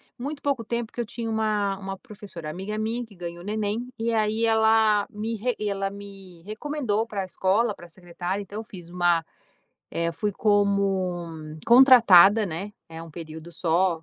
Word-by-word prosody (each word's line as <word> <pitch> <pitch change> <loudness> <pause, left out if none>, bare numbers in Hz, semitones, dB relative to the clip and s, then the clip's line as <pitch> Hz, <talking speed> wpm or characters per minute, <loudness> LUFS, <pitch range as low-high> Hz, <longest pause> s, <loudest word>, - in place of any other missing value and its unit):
muito 280 +4 -6
pouco 275 -5 0
tempo, 235 0 -3
que 240 - -3
eu - - -3
tinha 230 0 -5
uma 215 -3 0
uma 195 0 -6
professora 190 -5 -10
amiga 195 +5 -5
minha 225 +3 -2
que 215 -4 -14
ganhou 175 0 -7
neném, 215 +3 -2
e 230 +1 -1
aí 220 +1 +1
ela 220 -2 +4
me 220 +2 -4
re 245 +2 -1
ela 200 -2 -1
me 195 -4 -12
recomendou 225 0 -2
para 200 -3 -3
a - - -5
escola, 200 +4 +1
para 175 - -13
a - - -24
secretária. 180 +3 -5
Então 205 +2 -7
eu - - -5
fiz 180 -6 -11
uma 175 -2 +2 0.7
eh, 170 0 -1
fui 210 +5 -2
como 185 -6 0
contratada, 225 -5 +8
né. 195 +3 -5 0.2
É 165 0 -8
um 165 - -11
período 160 +1 -9
só, 170 0 +1
205 Hz, 175 wpm, -25 LUFS, 175-220 Hz, 0.7 s, contratada